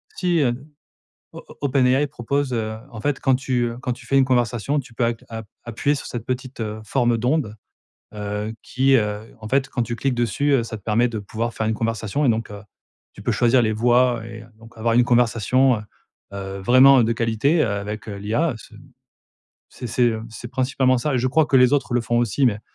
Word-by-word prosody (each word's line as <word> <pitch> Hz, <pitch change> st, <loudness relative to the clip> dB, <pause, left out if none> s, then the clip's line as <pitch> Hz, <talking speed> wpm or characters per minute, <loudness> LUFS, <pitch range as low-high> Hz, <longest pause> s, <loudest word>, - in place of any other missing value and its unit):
Si 175 Hz, -2 st, +1 dB
heu 125 Hz, -4 st, +2 dB, 0.8 s
o -, -, -8 dB
op -, -, -14 dB
OpenAI 135 Hz, 0 st, +2 dB
propose 135 Hz, +1 st, -2 dB
heu 110 Hz, -2 st, -2 dB
en 110 Hz, -, -8 dB
fait, 145 Hz, +3 st, -1 dB
quand 130 Hz, -2 st, +2 dB
tu 130 Hz, -2 st, -1 dB
heu, 115 Hz, 0 st, -6 dB
quand 125 Hz, -, -2 dB
tu 120 Hz, 0 st, -14 dB
fais 135 Hz, +3 st, +2 dB
une 135 Hz, -, +5 dB
conversation, 125 Hz, +2 st, 0 dB
tu 125 Hz, -3 st, -10 dB
peux 120 Hz, +1 st, 0 dB
app 115 Hz, -1 st, -2 dB
app 110 Hz, -2 st, -7 dB, 0.2 s
appuyer 120 Hz, +5 st, -1 dB
sur 140 Hz, -, -7 dB
cette 120 Hz, -2 st, -6 dB
petite, 130 Hz, 0 st, -5 dB
heu, 110 Hz, 0 st, -4 dB
forme 120 Hz, 0 st, +1 dB
d'onde, 125 Hz, -2 st, 0 dB, 0.6 s
heu, 105 Hz, +1 st, -4 dB
qui, 135 Hz, +1 st, +2 dB
heu 105 Hz, 0 st, -3 dB
en 110 Hz, -, -7 dB
fait 135 Hz, +1 st, +1 dB
quand 125 Hz, -, -2 dB
tu 115 Hz, +1 st, -4 dB
cliques 130 Hz, +3 st, -1 dB
dessus, 120 Hz, +5 st, 0 dB
heu, 130 Hz, -4 st, +3 dB
ça 115 Hz, -, -6 dB
te -, -, -22 dB
permet 115 Hz, +4 st, +2 dB
de 115 Hz, -2 st, -4 dB
pouvoir 110 Hz, +3 st, -4 dB
faire 110 Hz, -, -2 dB
une 110 Hz, -, 0 dB
conversation 115 Hz, +4 st, -2 dB
et -, -, +3 dB
donc, 115 Hz, -1 st, 0 dB
heu, 105 Hz, 0 st, -9 dB, 0.5 s
tu -, -, -12 dB
peux -, -, 0 dB
choisir 120 Hz, +1 st, +3 dB
les 110 Hz, -1 st, +1 dB
voix 120 Hz, +1 st, +2 dB
et 115 Hz, 0 st, -9 dB
donc 115 Hz, +1 st, -16 dB
avoir 115 Hz, +1 st, +1 dB
une 120 Hz, +1 st, +5 dB
conversation, 120 Hz, +2 st, +3 dB
heu, -, -, -8 dB, 0.5 s
heu, 95 Hz, 0 st, -6 dB
vraiment 130 Hz, +5 st, +6 dB
de 115 Hz, -, +1 dB
qualité, 115 Hz, +7 st, +1 dB
heu, -, -, +1 dB
avec, 105 Hz, +2 st, -5 dB
heu, 100 Hz, -, -5 dB
l'IA 115 Hz, +10 st, -1 dB
c'est 110 Hz, -, -15 dB, 0.9 s
c'est 125 Hz, -, -8 dB
c'est, 125 Hz, +2 st, +1 dB
heu, 110 Hz, 0 st, -5 dB
c'est 115 Hz, +2 st, -9 dB
principalement 130 Hz, 0 st, +1 dB
ça. 135 Hz, +3 st, -1 dB
Et -, -, +2 dB
je 125 Hz, -, +1 dB
crois 155 Hz, +4 st, +3 dB
que 135 Hz, -, +3 dB
les 125 Hz, +2 st, +5 dB
autres 140 Hz, -3 st, 0 dB
le 120 Hz, -, +2 dB
font 120 Hz, +1 st, -1 dB
aussi 120 Hz, +4 st, +1 dB
mais 105 Hz, -4 st, +1 dB
120 Hz, 225 wpm, -22 LUFS, 110-130 Hz, 0.9 s, vraiment